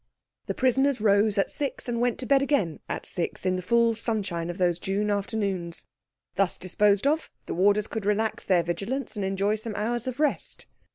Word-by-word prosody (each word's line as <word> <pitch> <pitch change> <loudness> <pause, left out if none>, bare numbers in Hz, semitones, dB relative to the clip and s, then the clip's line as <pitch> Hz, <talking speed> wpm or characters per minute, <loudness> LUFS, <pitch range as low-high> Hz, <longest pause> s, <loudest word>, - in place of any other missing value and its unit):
The - - -2
prisoners 265 +1 +2
rose 205 0 +3
at 195 - +1
six, 280 -3 -3
and 235 -1 -1
went 245 -1 +1
to - - -4
bed 275 0 +4
again 270 - 0
at - - -3
six, 175 +1 -3
in 185 0 +2
the 185 - -2
full 235 +4 +3
sunshine 195 -7 -2
of 175 - -5
those 175 -2 +1
June 205 +3 -1
afternoons. 200 -4 -2 0.5
Thus 195 -2 +2
disposed 200 +3 +2
of, 310 +3 +1 0.2
the - - -4
warders 205 +3 +3
could 220 -2 -4
relax 215 +1 0
their 180 -3 +4
vigilance 225 +11 -3
and 205 - -2
enjoy 195 +2 0
some 215 0 -5
hours 235 +3 -1
of 255 +1 -4
rest. 300 -2 0
210 Hz, 190 wpm, -26 LUFS, 190-235 Hz, 0.5 s, bed